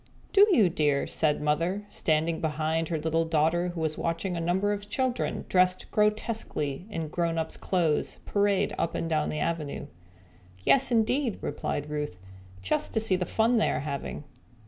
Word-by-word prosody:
"Do 410 Hz, +1 st, +7 dB
you, 220 Hz, -, +5 dB
dear?" 150 Hz, -4 st, +1 dB
said 150 Hz, -2 st, 0 dB
Mother, 170 Hz, +7 st, 0 dB
standing 160 Hz, +1 st, 0 dB
behind 160 Hz, +1 st, 0 dB
her 165 Hz, -, 0 dB
little 160 Hz, +1 st, 0 dB
daughter 165 Hz, +2 st, +1 dB
who 175 Hz, -2 st, -4 dB
was 155 Hz, -1 st, -2 dB
watching 170 Hz, +2 st, -2 dB
a -, -, -2 dB
number 190 Hz, +5 st, +1 dB
of 205 Hz, 0 st, -6 dB
children 255 Hz, 0 st, -1 dB
dressed 185 Hz, 0 st, +2 dB
grotesquely 210 Hz, -, -1 dB
in 165 Hz, -6 st, -3 dB
grown 165 Hz, +1 st, -1 dB
ups' 160 Hz, -, -2 dB
clothes 170 Hz, -5 st, 0 dB
parade 200 Hz, -1 st, +1 dB
up 165 Hz, -, -1 dB
and 165 Hz, -, -2 dB
down 155 Hz, -2 st, 0 dB
the 155 Hz, -, -3 dB
avenue. 155 Hz, -3 st, -2 dB, 0.8 s
"Yes, 270 Hz, -1 st, +4 dB
indeed," 235 Hz, +1 st, +1 dB
replied 145 Hz, -, -3 dB
Ruth, 150 Hz, -11 st, -3 dB, 0.5 s
"just 95 Hz, -, 0 dB
see 220 Hz, -4 st, +2 dB
the 180 Hz, -1 st, -2 dB
fun 230 Hz, +2 st, +2 dB
they 220 Hz, -, +3 dB
are -, -, -1 dB
having." 140 Hz, 0 st, -5 dB
170 Hz, 165 wpm, -28 LUFS, 155-205 Hz, 0.8 s, Do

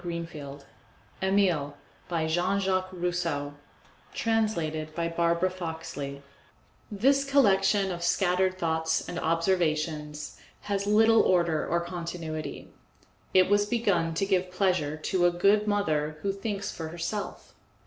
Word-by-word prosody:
EMILE 180 Hz, -7 st, +1 dB, 0.3 s
By 165 Hz, -2 st, 0 dB
Jean 175 Hz, +5 st, +1 dB
Jacques 185 Hz, -1 st, 0 dB
Rousseau 170 Hz, -5 st, -2 dB, 0.6 s
Translated 165 Hz, -9 st, -1 dB
by 170 Hz, 0 st, -1 dB
Barbara 170 Hz, +2 st, +1 dB
Foxley 160 Hz, -5 st, -5 dB
Author's 140 Hz, 0 st, -10 dB, 0.7 s
Preface 205 Hz, -2 st, -8 dB
This 275 Hz, +1 st, +5 dB
collection 205 Hz, -7 st, +3 dB
of 175 Hz, -1 st, -5 dB
scattered 185 Hz, +1 st, +2 dB
thoughts 160 Hz, -2 st, 0 dB
and 175 Hz, -, -4 dB
observations 155 Hz, -3 st, -1 dB, 0.2 s
has 200 Hz, -1 st, -2 dB
little 225 Hz, +2 st, +5 dB
order 170 Hz, -4 st, +2 dB
or 170 Hz, +1 st, +1 dB
continuity; 165 Hz, -3 st, -5 dB, 0.7 s
it 185 Hz, 0 st, +6 dB
was 205 Hz, +1 st, +3 dB
begun 200 Hz, -8 st, +1 dB
to 195 Hz, -, +1 dB
give 185 Hz, -2 st, +1 dB
pleasure 180 Hz, -5 st, 0 dB
to 175 Hz, +3 st, +1 dB
a -, -, +2 dB
good 200 Hz, +4 st, +3 dB
mother 155 Hz, -7 st, 0 dB
who 200 Hz, -, +1 dB
thinks 200 Hz, 0 st, -4 dB
for 160 Hz, -, -5 dB
herself. 170 Hz, +5 st, -5 dB
175 Hz, 125 wpm, -28 LUFS, 160-195 Hz, 0.7 s, it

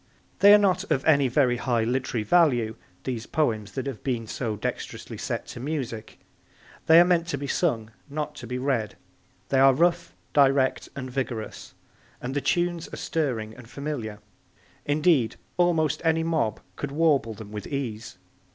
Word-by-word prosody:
They 200 Hz, -, +8 dB
are 210 Hz, -, +10 dB
not 200 Hz, -3 st, +2 dB
of 140 Hz, -4 st, +1 dB
any 140 Hz, -4 st, +5 dB
very 125 Hz, -1 st, +2 dB
high 120 Hz, -2 st, 0 dB
literary 120 Hz, -1 st, -1 dB
value, 120 Hz, -, +3 dB, 0.3 s
these 120 Hz, -3 st, -4 dB
poems 110 Hz, -9 st, -1 dB
that 130 Hz, -, -3 dB
have 135 Hz, -6 st, -6 dB
been 120 Hz, -4 st, -1 dB
so 110 Hz, 0 st, -3 dB
dexterously 105 Hz, -, -5 dB
set -, -, -3 dB
to -, -, -8 dB
music. 125 Hz, -6 st, -4 dB, 0.7 s
They 160 Hz, +1 st, +9 dB
are 175 Hz, -, +7 dB
meant 175 Hz, -2 st, +2 dB
to 145 Hz, -, -2 dB
be 140 Hz, -, -5 dB
sung, 120 Hz, -8 st, 0 dB, 0.2 s
not 150 Hz, +1 st, -3 dB
to 120 Hz, -, -8 dB
be 125 Hz, +2 st, -3 dB
read. 125 Hz, -5 st, -1 dB, 0.5 s
They 135 Hz, -, +3 dB
are 135 Hz, -1 st, +6 dB
rough, 170 Hz, +4 st, +1 dB, 0.2 s
direct 135 Hz, -2 st, +3 dB
and 130 Hz, -2 st, -6 dB
vigorous, 125 Hz, -4 st, -5 dB, 0.4 s
and 130 Hz, +2 st, -5 dB
the 145 Hz, -, +1 dB
tunes 175 Hz, +4 st, 0 dB
are -, -, -6 dB
stirring 115 Hz, -9 st, -2 dB
and 125 Hz, -3 st, -13 dB
familiar. 135 Hz, -6 st, -5 dB, 0.7 s
Indeed, 145 Hz, -5 st, +3 dB, 0.2 s
almost 170 Hz, -4 st, +2 dB
any 160 Hz, 0 st, +2 dB
mob 160 Hz, -10 st, 0 dB, 0.2 s
could 145 Hz, -, -4 dB
warble 140 Hz, -7 st, +2 dB
them 105 Hz, 0 st, -10 dB
with 105 Hz, -2 st, -6 dB
ease. 125 Hz, -7 st, -5 dB
135 Hz, 165 wpm, -26 LUFS, 115-155 Hz, 0.7 s, are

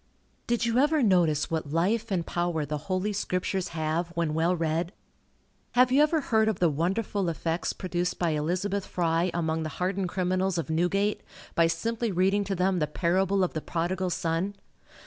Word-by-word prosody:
Did 235 Hz, 0 st, +1 dB
you 235 Hz, +1 st, +2 dB
ever 295 Hz, +1 st, +3 dB
notice 170 Hz, -7 st, +3 dB
what 160 Hz, -3 st, -2 dB
life 210 Hz, +8 st, +1 dB
and 180 Hz, -4 st, -1 dB
power 175 Hz, -3 st, -1 dB
the 150 Hz, 0 st, -3 dB
Holy 190 Hz, +3 st, 0 dB
Scriptures 185 Hz, -1 st, -1 dB
have, 160 Hz, +1 st, -1 dB
when 165 Hz, -3 st, 0 dB
well 165 Hz, +3 st, +2 dB
read? 165 Hz, +2 st, -1 dB, 0.8 s
Have 250 Hz, 0 st, +5 dB
you 275 Hz, +3 st, +5 dB
ever 305 Hz, +1 st, +3 dB
heard 220 Hz, -4 st, +2 dB
of 220 Hz, -4 st, +1 dB
the 170 Hz, -3 st, +3 dB
wonderful 190 Hz, +4 st, -1 dB
effects 165 Hz, +1 st, -2 dB
produced 180 Hz, -1 st, -2 dB
by 170 Hz, -2 st, +1 dB
Elizabeth 185 Hz, +6 st, -1 dB
Fry 170 Hz, 0 st, +1 dB
among 160 Hz, -1 st, -1 dB
the 155 Hz, -, -3 dB
hardened 185 Hz, 0 st, -1 dB
criminals 185 Hz, 0 st, 0 dB
of 165 Hz, -1 st, -2 dB
Newgate, 195 Hz, +6 st, +1 dB, 0.3 s
by 165 Hz, 0 st, +4 dB
simply 230 Hz, +6 st, -1 dB
reading 190 Hz, +3 st, +2 dB
to 195 Hz, 0 st, -2 dB
them 185 Hz, 0 st, +1 dB
the 150 Hz, -, +1 dB
parable 190 Hz, +5 st, +1 dB
of 180 Hz, -, -1 dB
the 155 Hz, -, -3 dB
Prodigal 180 Hz, +3 st, -2 dB
Son? 170 Hz, +4 st, -1 dB
180 Hz, 175 wpm, -27 LUFS, 165-200 Hz, 0.8 s, Have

